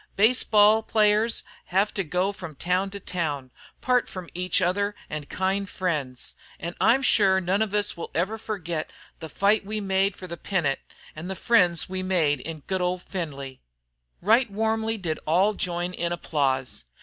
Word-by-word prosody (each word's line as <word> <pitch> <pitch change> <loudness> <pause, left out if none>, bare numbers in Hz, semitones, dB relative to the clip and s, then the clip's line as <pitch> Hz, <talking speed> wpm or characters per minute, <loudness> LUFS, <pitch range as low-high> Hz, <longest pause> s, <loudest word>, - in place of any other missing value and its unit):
Baseball 215 -1 +5
players 215 +1 +2 0.2
hev 195 +3 +1
to 195 - -1
go 180 +4 0
from 180 -6 -9
town 180 +5 0
to 200 +1 -7
town 160 -7 -2
an' - - -22
part 250 -1 +2
from 185 -3 -8
each 180 +1 0
other 200 +3 0 0.2
an' 150 -1 -5
kind 190 +1 -1
friends. 150 -9 -2 0.3
An' 170 +1 -4
I'm 265 +3 +4
sure 195 -6 +4
none 190 +3 0
of 210 -2 0
us 205 0 +1
will 170 - -6
ever 195 +7 0
forgit 175 -8 -4 0.3
the 160 - -7
fight 200 +7 +2
we 215 +2 -3
made 195 -1 +1
fer 185 - -8
the 170 -1 -6
pennant 165 -7 0 0.4
an' 155 +3 -6
the 190 - -3
friends 180 -7 +3
we 185 0 -4
made 165 -7 +2
in 155 +3 -7
good 190 +4 -2
old 180 0 -1
Findlay." 140 -8 -6 0.6
Right 230 +5 +4
warmly 220 +2 0
did 165 -6 -3
all 185 +7 +3
join 175 -2 -2
in 170 -1 -2
applause. 135 - -1
185 Hz, 175 wpm, -25 LUFS, 170-205 Hz, 0.6 s, Baseball